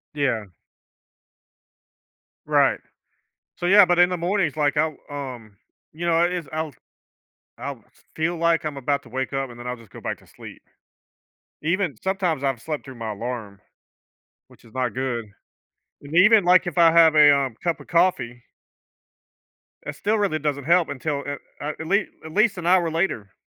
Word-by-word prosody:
Yeah. 115 -10 -1 1.9
Right. - - +3 0.8
So, 175 - -3
yeah 200 +2 +8
but 175 0 +1
in 175 - +6
the 180 - -2
mornings, 175 -3 0
like, 145 -1 +1
I'll, 155 -1 +1
um 125 -7 -7 0.4
You 170 +3 -5
know, 170 - +2
i 170 +1 +4
it's 175 -5 -4
I'll 155 -1 -3 0.9
I'll - - -6
f - - -29
feel 160 +2 -1
like 170 0 +1
I'm 150 -2 -4
about 140 +1 -1
to - - -15
wake 130 +2 -4
up, 135 -1 -2
and 120 - -12
then 120 - -9
I'll 125 - -3
just 115 -4 -18
go - - -11
back - - -4
to - - -22
sleep. - - -13 1.0
Even 170 - 0
Sometimes, 185 -7 -1
I've 135 -4 -1
slept 150 +3 -4
through 130 -2 -10
my 115 -2 -5
alarm, 105 -2 -6 0.9
which - - -20
is 115 - -19
not 125 -4 -1
good, 125 -3 -2 0.8
and 145 +2 -9
even, 210 +2 +6
like, 180 +1 +5
if 175 -2 -3
I 165 -1 +7
have 165 -1 +6
a, 145 -2 +7
um, 135 -4 -1
cup 170 -2 -1
of - - -13
coffee 170 -9 +1 1.4
it 145 - -5
still 210 +7 0
really 195 -7 0
doesn't 145 -1 -2
help 170 +3 +3
until 140 +1 -3
a 145 - -3 0.3
a 145 - -5
at 160 - -5
lea 200 +4 +2 0.2
at 160 0 -9
least 215 -1 +3
an 170 - -6
hour 175 -1 +3
later. 160 - -2
155 Hz, 180 wpm, -23 LUFS, 130-175 Hz, 1.9 s, yeah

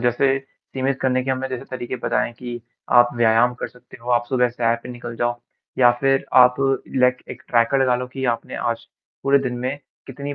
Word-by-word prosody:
जैसे 130 +3 +2 0.4
सीमित 135 0 -1
करने 130 -1 +1
के 135 - -1
हमें 130 0 -2
जैसे 130 -2 -5
तरीके 130 0 -4
पता 125 - 0
हैं 120 - -3
कि 120 0 -7 0.3
आप 120 0 +7
व्यायाम 120 +1 +3
कर - - -5
सकते 125 - -16
हो, 120 +1 -5
आप 120 -1 +3
सुबह 125 -2 +2
सैर 115 -1 0
पे - - -9
निकल 120 -1 -7
जाओ 120 +1 -1 0.4
या 120 -1 +7
फिर 135 0 +2
आप 125 -1 +7 0.4
लाइक 125 0 +3
एक - - -9
ट्रैकर 120 +3 +3
लगा 125 -1 +3
लो 125 0 -4
कि 135 -1 -4
आपने 115 - -7
आज - - -3 0.4
पूरे 140 0 +4
दिन 130 -3 -3
में 130 +3 -2 0.3
कितनी 140 +2 -6
125 Hz, 210 wpm, -21 LUFS, 120-130 Hz, 0.4 s, आप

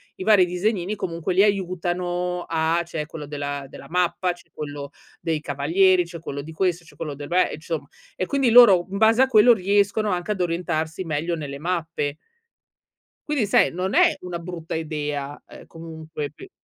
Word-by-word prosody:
i 185 - -6
vari 205 -3 +6
disegnini 185 +2 -1
comunque 170 -1 -3
li 190 - +5
aiutano 180 -2 -1
a 165 +1 +1
c'è 160 -3 -5
quello 150 -1 -8
della 145 -1 -4
della - - -11
mappa, 180 +1 +1
c'è 175 - -20
quello 145 -1 -6 0.3
dei 160 -2 -1
cavalieri, 175 +7 +3
c'è 170 -1 -9
quello 140 -3 -5
di 160 +3 -10
questo, 175 0 0
c'è - - -17
quello 150 -3 -5
dei 145 0 -8
beh 180 +2 +2
Insomma 155 -2 -5 0.3
e 185 - -1
quindi 275 0 +1
loro 200 -7 +8
in 200 - -3
base 225 +3 +5
a 265 - +5
quello, 235 0 +7
riescono 205 +1 +1
anche 180 +3 -2
ad 190 -3 -2
orientarsi 170 0 -2
meglio 165 +2 -1
nelle 140 -2 -6
mappe. 160 -3 -2 1.1
Quindi 275 -8 +1
sai, 205 - +3
non 185 +2 -3
è 350 -1 +5
una 180 -2 -5
brutta 170 -1 -7
idea, 150 -3 -4
ehm, - - -13
comunque 160 -2 -7
pe 380 - -13
175 Hz, 175 wpm, -23 LUFS, 155-190 Hz, 1.1 s, loro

